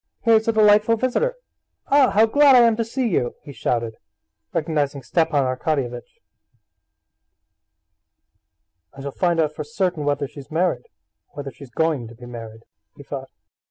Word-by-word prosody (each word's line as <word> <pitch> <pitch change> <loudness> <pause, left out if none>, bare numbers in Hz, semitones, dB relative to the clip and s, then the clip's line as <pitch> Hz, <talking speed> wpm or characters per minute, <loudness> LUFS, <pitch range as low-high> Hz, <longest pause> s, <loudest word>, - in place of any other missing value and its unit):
"Here's 225 -1 +3
a - - +4
delightful 215 +1 +4
visitor! 255 - 0 0.5
Ah, 275 -2 +4
how 220 +2 +4
glad 280 +4 +5
I 245 - +8
am 230 -1 +4
to 230 - +1
see 245 +3 -2
you!" 125 - -1
he 145 - -10
shouted, 115 -2 -2 0.5
recognizing 145 -3 -1
Stepan 155 +2 +1
Arkadyevitch. 130 -2 -3 2.7
"I 135 - -11
shall 140 - -4
find 175 +2 0
out 155 -1 +1
for 150 - -5
certain 175 +1 -2
whether 145 -1 -1
she's 140 0 -12
married, 180 - -1 0.5
or 145 - -5
when 135 -2 -8
she's 130 +1 -13
going 150 -3 -1
to 115 - -13
be 120 +2 -12
married," 115 -2 -9 0.3
he - - -11
thought. - - -7
155 Hz, 155 wpm, -22 LUFS, 135-220 Hz, 2.7 s, I